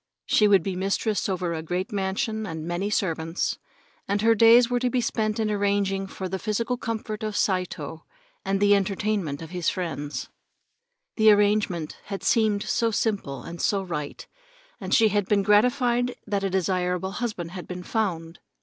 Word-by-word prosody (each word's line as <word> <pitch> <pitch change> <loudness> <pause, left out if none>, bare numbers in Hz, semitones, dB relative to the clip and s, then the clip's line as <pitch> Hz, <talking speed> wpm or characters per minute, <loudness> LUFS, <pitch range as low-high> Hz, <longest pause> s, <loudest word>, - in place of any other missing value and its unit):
She 210 - +4
would 195 -4 +5
be 190 -2 -3
mistress 200 +3 -1
over 180 -2 -1
a 160 - -3
great 180 +4 -3
mansion 205 +2 -2
and 160 -2 -5
many 175 +4 -2
servants, 165 -4 -1 0.5
and 200 +1 0
her 230 0 +6
days 230 +2 +7
were 245 0 0
to 250 0 +1
be 250 - 0
spent 215 -2 -1
in 215 -1 0
arranging 200 -1 0
for 190 0 -5
the 190 +1 -4
physical 230 +4 -1
comfort 225 -3 -4
of 215 -1 -3
Saito 175 -5 -2 0.4
and 195 0 0
the 205 0 +5
entertainment 195 -6 -1
of 160 - -10
his 180 -2 0
friends. 155 -5 -4 0.9
The 220 -1 +6
arrangement 205 -6 +2
had 195 -1 -6
seemed 215 -3 +2
so 230 - +1
simple, 205 - -2
and 170 0 -7
so 200 -2 +1
right, 150 -6 -5 0.5
and - - -6
she 225 -2 +5
had 205 -2 0
been 200 -1 +2
gratified 245 +3 +3
that 200 -2 -1
a 195 - +1
desirable 185 0 0
husband 200 -7 -4
had 180 -1 -8
been 180 0 -6
found. 175 -7 -2
200 Hz, 170 wpm, -25 LUFS, 180-215 Hz, 0.9 s, days